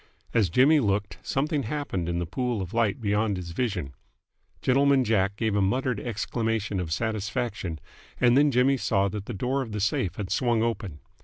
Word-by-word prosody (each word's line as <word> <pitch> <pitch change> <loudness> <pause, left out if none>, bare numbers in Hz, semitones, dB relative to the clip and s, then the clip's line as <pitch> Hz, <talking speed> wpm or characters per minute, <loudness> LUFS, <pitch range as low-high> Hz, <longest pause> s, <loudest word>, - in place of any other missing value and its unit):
As 105 -6 +3
Jimmy 140 - +5
looked, 100 -5 -1
something 145 +2 -1
happened 110 - -3
in 85 - -1
the 85 - -1
pool 120 +5 -2
of 95 -2 -5
light 115 +1 +1
beyond 105 -2 0
his 85 -2 -6
vision. 90 - -2 0.7
Gentleman 135 +1 +4
Jack 100 -3 +1
gave 110 -1 -1
a 100 - +2
muttered 125 +3 0
exclamation 110 -3 -2
of 85 -3 -4
satisfaction, 105 -3 -2 0.4
and 120 -1 +5
then 145 +2 +5
Jimmy 135 +1 +3
saw 100 -5 +1
that 100 +1 -6
the 120 - -4
door 130 +7 -1
of 115 -5 -6
the 105 - -2
safe 100 -2 0
had 100 -3 -5
swung 120 -3 +2
open. 105 -10 -3
110 Hz, 180 wpm, -26 LUFS, 95-125 Hz, 0.7 s, Jimmy